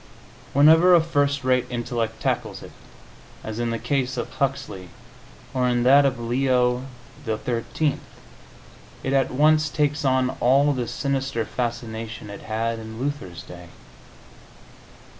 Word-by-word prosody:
Whenever 160 +5 +7
a - - +7
first 145 -4 0
rate 125 -1 +2
intellect 120 -2 -3
tackles - - -2
it, - - -11 0.7
as 110 +1 -5
in 120 0 -1
the 115 - -1
case 130 +2 -1
of 120 - -4
Huxley, 135 -10 -3 0.6
or 125 -1 +1
in 120 -1 +1
that 140 +3 +6
of 130 -3 -2
Leo 125 +1 +1 0.4
XIII., 120 +5 -2 1.0
it 135 - -1
at 135 -1 +2
once 155 +3 +3
takes 150 0 0
on 130 -1 +2
all 140 +4 +4
the 125 -3 -3
sinister 135 -4 -2
fascination 115 -3 -5
it 100 - -9
had 115 +1 -2
in 110 0 -9
Luther's 130 - -4
day. 90 0 -11
125 Hz, 130 wpm, -23 LUFS, 115-140 Hz, 1.0 s, Whenever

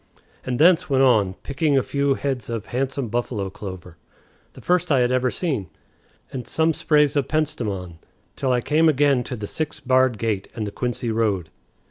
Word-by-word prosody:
and 125 -1 -2
thence 175 +3 +4
went 135 -1 +3
on, 105 -8 +3
picking 140 0 +1
a 130 - +3
few 140 -1 0
heads 130 -6 -3
of 115 -3 -4
handsome 130 +1 -2
buffalo 115 -4 -2
clover, 95 -4 -9 0.6
the - - -13
first 180 -1 +1
I 135 -3 +4
had 120 0 +2
ever 130 0 +2
seen, 135 - -3 0.6
and 130 -2 -5
some 160 0 +1
sprays 150 -1 +2
of 140 -2 +1
penstemon, 105 - -2 0.4
till 130 - -1
I 125 -1 +2
came 160 +5 +3
again 140 -3 +3
to 125 - -4
the 105 -3 -5
six 155 +8 -4
barred 130 -2 +2
gate 105 -3 -2
and 110 - -3
the 100 - -5
Quincy 120 0 -2
road. 105 -7 0
130 Hz, 180 wpm, -23 LUFS, 110-145 Hz, 0.6 s, thence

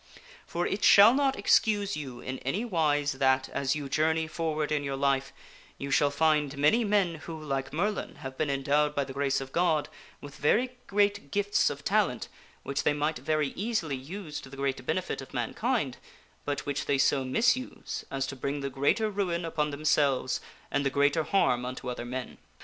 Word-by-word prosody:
For 175 +1 -2
it 200 +1 -2
shall 205 +4 +8
not 270 0 +1
excuse 205 -3 +2
you 130 -5 -7
in 130 0 -5
any 190 - -2
wise 150 -8 +1
that, 130 -1 +2
as 135 0 -1
you 145 -2 -4
joiirney 160 +3 +1
for 155 0 -2
ward 155 0 -1
in 150 -1 0
your 140 -1 -2
life, 135 0 +1 0.5
you 140 0 -5
shall 145 +1 +4
find 150 -1 +1
many 150 +12 +4
men 200 -5 +2
who, 165 -2 -6
like 135 -3 -3
Merlin, 200 +7 -2
have 130 0 -8
been 155 +1 -1
endowed 145 +2 +1
by 140 - +1
the 135 - -8
grace 140 0 0
of 135 0 -7
God 165 -3 +1 0.3
with 145 0 -11
very 240 - +2 0.2
great 205 -5 +1
gifts 205 +3 +2
of - - -7
talent - - +1 0.3
which 140 -1 -2
tJiey 145 - +2
might 150 +2 -1
very 155 -2 0
easily 195 -8 -2
use 150 +2 -7
to 135 - -12
the 135 - -11
great 135 -1 -2
benefit - - -1
of - - -11
mankind, - - -1 0.5
but 145 0 -2
which 145 0 -2
they 140 - +2
so 135 0 +3
misuse 235 - 0
as 135 -1 -2
to 135 - -6
bring 140 +2 -3
the 140 0 -3
greater 145 - +1
ruin 185 -5 -1
upon 155 -2 -1
themselves 145 -3 +1 0.3
and 145 - +1
the 135 - +2
greater 145 +3 +2
harm 125 -11 +2
unto 125 0 -6
other 120 -1 -5
men. 125 +1 -6
145 Hz, 190 wpm, -28 LUFS, 135-170 Hz, 0.5 s, shall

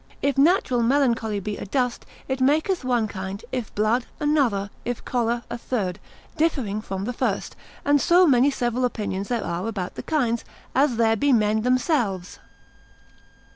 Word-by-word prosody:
If 280 -1 +2
natural 275 -4 +3
melancholy 235 -4 +1
be 205 +1 -4
adust, 245 +3 -2 0.2
it 265 0 -2
maketh 315 +7 +2
one 245 -3 +1
kind; 190 0 -6
if 250 -4 -4
blood, 220 +4 +1
another; 255 -10 +1
if 245 -1 -4
choler, 235 -1 0
a 240 - -5
third, 200 -8 -2 0.4
differing 260 -10 0
from 195 -2 -4
the 245 - -3
first; - - -2 0.3
and 285 -1 +4
so 355 +2 +5
many 270 -3 +5
several 245 -2 -1
opinions 205 -5 -2
there 240 -2 -1
are 175 +4 -3
about 195 -5 -4
the - - -6
kinds, 240 -7 0 0.3
as 270 -2 +3
there 225 -1 +3
be 285 +6 +2
men 215 -2 +3
themselves. 245 - 0
240 Hz, 155 wpm, -24 LUFS, 210-270 Hz, 0.4 s, so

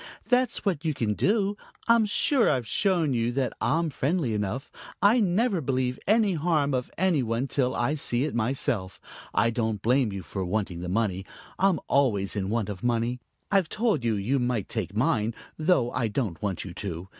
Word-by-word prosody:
"That's 250 -1 +1
what 175 -6 0
you 155 -3 -1
can 110 -5 0
do. 200 - +1 0.3
I'm 230 -2 +5
sure 245 +4 +2
I've 125 -3 0
shown 175 - +1
you 115 0 0
that 130 -1 -1
I'm 165 +1 +1
friendly 140 -3 0
enough. 105 +6 -3 0.3
I 215 +5 +5
never 200 -1 +2
believe 130 -2 -1
any 215 -1 +4
harm 155 -3 +1
of 125 -1 -1
any 180 -5 +2
one 115 +2 -1
till 130 -2 0
I 120 +5 +1
see 130 -4 0
it 150 - -2
myself. 110 -5 -1 0.3
I 115 +1 +2
don't 110 -2 -1
blame 125 -1 +2
you 95 -1 -5
for 95 +4 -4
wanting 95 -1 -2
the 90 0 -5
money. 95 -2 0 0.4
I'm 190 -5 +3
always 110 -9 +2
in 95 -2 -2
want 110 -2 0
of 100 -3 -6
money. 120 +1 0 0.3
I've 195 -5 +3
told 215 - 0
you 115 -2 +1
you 115 +8 0
might 120 -4 -1
take 100 -4 -3
mine, 115 -4 +1 0.2
though 155 -7 +2
I 125 -3 0
don't 105 - -3
want 95 -4 -2
you 90 - -7
to. 90 -1 -5
125 Hz, 190 wpm, -27 LUFS, 110-165 Hz, 0.4 s, I'm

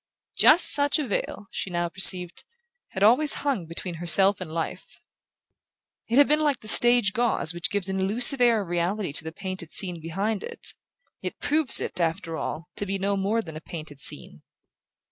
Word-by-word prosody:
Just 330 +3 +6
such 285 +1 +1
a 300 - -4
veil, 205 0 -5
she - - -6
now 175 -1 -3
perceived, 180 0 +4 0.4
had 190 - -5
always 255 +8 +3
hung 250 - -3
between 170 +2 -8
herself 190 +3 +3
and 170 -4 -8
life. 165 0 -7 1.1
It 235 - -1
had 285 - +5
been 300 +1 +1
like 295 -3 -1
the 215 - -10
stage 240 -4 +4
gauze 230 -8 -1
which 175 -1 -3
gives 205 -2 -4
an 190 0 -4
illusive 240 +7 +3
air 230 -4 +2
of - - -13
reality 175 0 -3
to 160 - -1
the 160 - -8
painted 185 -1 -8
scene 180 -4 -1
behind 195 +6 -4
it, - - -6 0.5
yet - - -7
proves 300 -2 +2
it, 180 - -6
after 165 0 -3
all, 160 +1 -7
to 205 - -5
be 195 +1 -3
no 200 +1 -2
more 205 +4 -2
than 160 -5 -11
a 155 - -9
painted 155 -4 -11
scene. 70 - +3
195 Hz, 185 wpm, -23 LUFS, 170-230 Hz, 1.1 s, Just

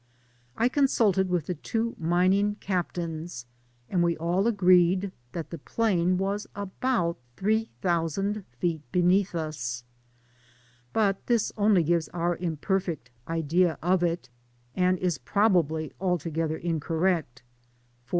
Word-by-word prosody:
Z 240 - +4
consulted 225 -9 +2
with 175 -4 0
the 180 - -2
two 225 +8 -2
mining 185 +5 +2
Captains, 170 - -3 0.4
and 180 +4 +1
we 170 -1 +2
all 175 +6 +1
agreed 185 -2 +4 0.2
that 165 -3 -5
the 170 - -6
plain 185 -1 +1
was 200 +2 -2
about 200 - -1 0.2
three 220 +3 +1
thousand 190 +4 0
feet 165 +1 -1
beneath 180 +1 +3
us; 130 -7 -3 1.1
but 200 -3 +1
this 235 -3 +2
only 205 -4 +4
gives 165 0 +1
our 175 0 +1
imperfect 170 - -2 0.2
idea 165 +1 +1
of 180 +1 +3
it, 170 -4 -1 0.4
and 185 0 +2
is 175 -6 -1
probably 160 - +1
altogether 165 -3 -1
incorrect; 165 -4 -1 0.6
foi? - - -30
180 Hz, 120 wpm, -27 LUFS, 165-195 Hz, 1.1 s, Z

